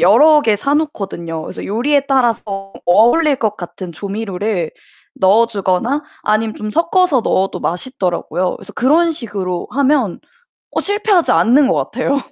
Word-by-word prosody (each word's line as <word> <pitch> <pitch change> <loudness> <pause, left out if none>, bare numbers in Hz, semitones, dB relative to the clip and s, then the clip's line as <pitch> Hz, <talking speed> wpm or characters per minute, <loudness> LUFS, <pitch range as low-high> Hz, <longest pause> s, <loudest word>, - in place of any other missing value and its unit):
여러 295 - +6
개 215 -2 +2
사 280 +7 -1
놓거든요. 190 - -3
그래서 - - -7
요리에 275 +7 0
따라서 220 -7 0
어울릴 240 - +4
것 215 -4 -1
같은 175 0 -8
조미료를 200 -1 -3 0.4
넣어 210 +5 +4
주거나 225 +7 -1 0.2
아니면 215 +1 0
좀 215 0 -5
섞어서 335 - +2
넣어도 195 -2 0
맛있더라고요. 180 -2 -2
그래서 - - -13
그런 320 +7 +3
식으로 195 - -4
하면 270 -7 +1 0.5
어 - - -1
실패하지 405 -3 +1
않는 235 - +4
것 - - +2
같아요. 260 +4 -1
225 Hz, 335 characters per minute, -16 LUFS, 195-280 Hz, 0.5 s, 여러